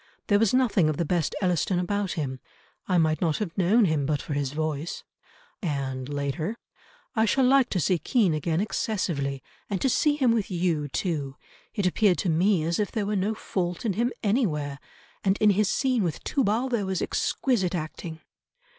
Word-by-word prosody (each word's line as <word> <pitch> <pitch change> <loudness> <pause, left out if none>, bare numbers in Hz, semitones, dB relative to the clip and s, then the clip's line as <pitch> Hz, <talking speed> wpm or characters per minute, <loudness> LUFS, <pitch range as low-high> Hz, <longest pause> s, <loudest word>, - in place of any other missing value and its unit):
There 205 -1 +5
was 225 -2 +3
nothing 230 -10 +3
of 155 - -2
the 170 - 0
best 170 -1 0
Elliston 180 +1 +1
about 200 +2 -1
him, 130 -5 -3 0.5
I 185 - +2
might 155 -2 +2
not 165 -4 +1
have 200 -6 -4
known 200 +5 +4
him 155 -5 0
but 150 -1 0
for 150 - -5
his 140 -2 -1
voice," 155 +1 -3 0.6
and 135 - -3
later, 145 +8 -2 0.6
"I 220 0 +3
shall 265 +4 +2
like 265 -1 +4
to 185 - 0
see 175 +1 +2
Kean 200 - +2
again 160 +2 0
excessively, 170 - -2 0.3
and 200 -3 -1
to 265 - +1
see 295 +4 +3
him 260 -5 +3
with 225 -3 0
you 170 -5 0
too. 145 -3 -2 0.4
It 205 - 0
appeared 185 0 +3
to 185 - -1
me 175 +2 +3
as 170 +4 -1
if 210 - 0
there 215 -3 -1
were 210 +1 -1
no 205 +3 0
fault 180 -2 -3
in 210 - +1
him 235 +5 0
anywhere; 155 - 0 0.4
and 195 0 +2
in 210 -1 +5
his 205 +1 +2
scene 255 0 +1
with 170 -5 -2
Tubal 245 -1 +1
there 235 -6 -1
was 190 -1 -1
exquisite 195 -9 0
acting." 160 0 -6
180 Hz, 190 wpm, -26 LUFS, 155-215 Hz, 0.6 s, There